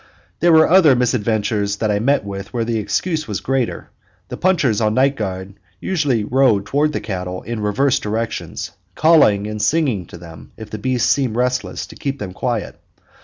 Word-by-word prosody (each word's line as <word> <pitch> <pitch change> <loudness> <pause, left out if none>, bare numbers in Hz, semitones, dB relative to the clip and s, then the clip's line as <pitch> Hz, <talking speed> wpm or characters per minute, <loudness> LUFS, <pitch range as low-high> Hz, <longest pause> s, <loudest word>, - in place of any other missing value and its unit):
There 170 +1 +4
were 160 -1 +6
other 165 -6 +6
misadventures 110 -4 0
that 105 +1 -1
I 100 - +1
met 130 0 +1
with 100 -1 -7
where 115 -2 -2
the 115 -1 -1
excuse 155 - -2
was - - -3
greater. 135 -2 -2 0.4
The - - -5
punchers 155 - +1
on 110 0 +1
night 135 +2 +3
guard 95 -3 -5 0.3
usually 145 - 0
rode 115 -3 +1
round 150 +2 +2
the - - -1
cattle 90 -3 -5
in 115 +1 -5
reverse 120 +6 +1
directions; 110 +2 -4 0.2
calling 145 -11 +4
and 105 0 -4
singing 115 - 0
to - - -11
them 85 -2 -13
if 110 -1 -10
the 110 - -5
beasts 125 +1 0
seemed 130 -6 0
restless, 125 +1 -1
to - - -14
keep 140 -1 -4
them 95 -8 -6
quiet. 120 0 -3
115 Hz, 180 wpm, -19 LUFS, 105-140 Hz, 0.4 s, were